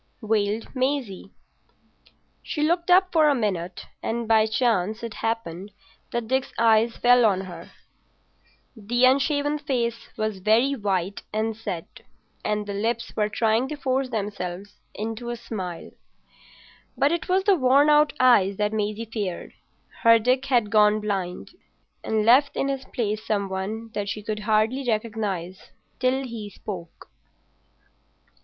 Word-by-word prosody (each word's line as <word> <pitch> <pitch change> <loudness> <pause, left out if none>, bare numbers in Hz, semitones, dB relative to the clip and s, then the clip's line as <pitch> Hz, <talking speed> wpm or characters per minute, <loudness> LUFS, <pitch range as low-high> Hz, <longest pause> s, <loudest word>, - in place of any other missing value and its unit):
wailed 215 0 0
Maisie. 255 -8 -2 1.1
She 300 - -3
looked 345 +3 +1
up 370 +1 +5
for 310 -2 +4
a 285 - +3
minute, 185 -6 -3 0.2
and 230 0 -3
by 220 -1 +4
chance 220 -1 0
it 230 -2 -5
happened 210 -5 -3 0.4
that 235 -2 -3
Dick's 260 +2 0
eyes 230 0 +3
fell 245 0 +5
on 195 -4 +3
hers. 175 -3 -9 1.1
The 240 +3 +1
unshaven 285 +3 +2
face 235 -5 -2
was 215 -3 -2
very 225 +8 +3
white 200 -5 -2
and 220 +1 -1
set, 200 -7 -6 0.4
and 210 0 -1
the 205 - -5
lips 230 +3 -2
were 210 -1 +1
trying 225 +3 +1
to 300 - -5
force 265 -1 -1
themselves 200 -3 -4 0.2
into 225 +3 -5
a 240 - -2
smile. 185 -7 -6 1.1
But 280 - +3
it 340 +2 -2
was 375 +1 +2
the 400 - +4
worn 275 -2 +4
out 300 0 +5
eyes 200 -7 +4
that 210 0 0
Maisie 215 +1 -2
feared. 205 -5 -5 0.5
Her 230 -1 +7
Dick 255 +4 +1
had 235 -5 +2
gone 210 -1 +4
blind 195 -4 -3 0.5
and 220 -1 0
left 265 +5 +5
in 275 - 0
his 270 -1 -3
place 215 -3 -3
some 200 -2 -1
one 215 +4 -4
that 205 -1 -3
she 210 +1 -4
could 210 0 -3
hardly 220 +5 +1
recognise 210 -5 -3 0.3
till 260 +1 +1
he 225 -4 -7
spoke. 180 -4 -9
220 Hz, 145 wpm, -24 LUFS, 205-255 Hz, 1.1 s, Her